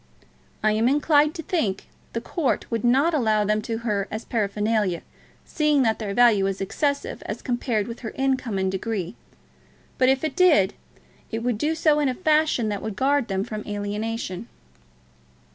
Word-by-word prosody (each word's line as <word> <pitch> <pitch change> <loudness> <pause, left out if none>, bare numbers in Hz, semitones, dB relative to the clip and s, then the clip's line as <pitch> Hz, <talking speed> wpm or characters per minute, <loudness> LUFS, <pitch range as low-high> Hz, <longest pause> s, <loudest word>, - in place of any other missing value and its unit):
"I 215 - +4
am 220 +3 +2
inclined 295 +2 +3
to 325 - -5
think 225 - -1 0.3
the 230 - -2
court 300 +2 -1
would 230 -2 -1
not 270 +8 +3
allow 220 -7 +2
them 215 +1 +1
to 225 +1 -3
her 200 -3 0
as 215 +2 -5
paraphernalia, 210 -4 0 0.4
seeing 300 -3 +2
that 225 -2 +1
their 200 -3 -4
value 225 -5 +5
is 195 0 -3
excessive 280 +9 -2
as - - -5
compared 240 -4 -1
with 235 0 -7
her 225 - -5
income 260 -6 0
and 190 0 0
degree; 195 -1 -3 0.8
but 255 0 +5
if 265 +1 +2
it 310 -3 -2
did, 320 - +4 0.6
it 225 +1 -4
would 240 -3 -1
do 310 +5 0
so 305 -2 +3
in 290 -2 +2
a 255 - -2
fashion 310 -7 +2
that 205 -2 -3
would 215 -2 -5
guard 275 +2 +1
them 195 -1 -1
from 215 -1 -6
alienation." 210 0 -4
230 Hz, 175 wpm, -24 LUFS, 210-280 Hz, 0.8 s, value